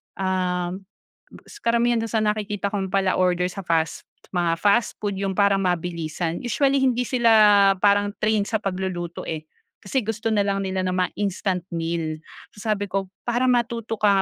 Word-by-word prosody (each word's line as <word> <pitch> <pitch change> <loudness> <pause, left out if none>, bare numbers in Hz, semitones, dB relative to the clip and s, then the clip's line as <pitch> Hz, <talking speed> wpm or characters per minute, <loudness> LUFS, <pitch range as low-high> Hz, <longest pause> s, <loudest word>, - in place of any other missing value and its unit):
um, 180 -2 -1 0.6
gus 415 - -15
karamihan 235 - +2
dun 225 - -2
sa 220 -1 +1
nakikita 210 -1 -1
kong 195 -2 -2
pala-order 185 -2 +1
sa 195 - -8
fast 165 -1 0 0.3
mga 175 -2 +1
fast 210 +3 +2
food, 205 -2 -2
yung 195 - 0
parang 200 -1 +3
mabilisan, 170 -1 -2
usually 275 +3 +2
hindi 250 -1 +2
sila 240 -3 +3 0.5
parang 205 0 +3
trained 215 -1 +1
sa 220 -2 0
pagluluto 185 -3 -4
eh 155 -1 -4 0.4
kasi 255 +6 0
gusto 225 +1 -3
nalang 200 -1 +1
nila 190 0 -2
ng 185 - 0
mga 180 0 +1
instant 190 -2 -1
meal. 165 -2 -2 0.4
Sabi 205 -1 -2
ko, 195 -1 -1 0.2
"Para 240 +2 +1
matuto 235 -2 0
ka 205 -2 +3
195 Hz, 155 wpm, -23 LUFS, 180-220 Hz, 0.6 s, parang